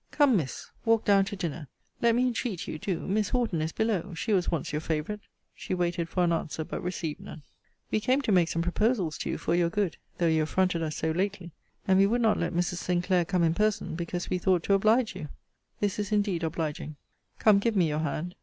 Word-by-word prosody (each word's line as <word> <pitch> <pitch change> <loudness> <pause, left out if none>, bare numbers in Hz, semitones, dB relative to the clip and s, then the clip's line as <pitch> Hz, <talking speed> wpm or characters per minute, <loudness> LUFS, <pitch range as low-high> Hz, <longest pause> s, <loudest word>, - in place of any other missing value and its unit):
Come, 285 -5 +4
Miss, 150 -9 -3
walk 225 -1 +2
down 200 -1 +5
to 195 - -5
dinner. 165 -5 -4 0.3
Let 235 -1 +4
me 250 +1 +3
entreat 235 -6 -2
you, 155 - -5
do. 185 -1 -2
Miss 210 +2 0
Horton 230 -10 0
is 160 +1 -1
below: 200 -4 -1
she 210 +6 -1
was 185 -3 +2
once 165 -5 -2
your 150 0 -2
favourite. 160 +6 -2 0.3
She - - -4
waited 175 -1 -1
for 180 - +1
an 170 - +2
answer: 160 -1 -2
but - - -5
received 175 -4 -3
none. 150 - -10 0.5
We - - +2
came 255 +5 +2
to 225 - 0
make 175 -3 +4
some 165 0 -1
proposals 185 -2 +1
to - - -3
you, - - -1
for - - -1
your 175 -1 +3
good; 200 -1 -1 0.2
though 175 - +1
you 160 -1 +3
affronted 175 +2 +1
us 155 -1 -2
so 160 - 0
lately. 185 0 -2 0.4
And 190 0 +5
we 195 - +6
would 240 +3 +1
not 220 -2 +3
let - - -1
Mrs. 175 0 -1
Sinclair 180 0 +1
come 180 -1 +1
in 165 -1 +3
person, 210 0 0
because 175 +1 -4
we 180 - -1
thought 180 -2 +2
to 200 - +2
oblige 215 +2 +3
you. 155 -6 -6 0.5
This 205 0 0
is 205 +1 -3
indeed 205 -5 +1
obliging. 155 -2 -3 0.4
Come, 210 -2 +5
give 225 +2 0
me 180 -4 +4
your 150 0 -1
hand. 160 +3 -3
180 Hz, 230 wpm, -28 LUFS, 165-210 Hz, 0.5 s, we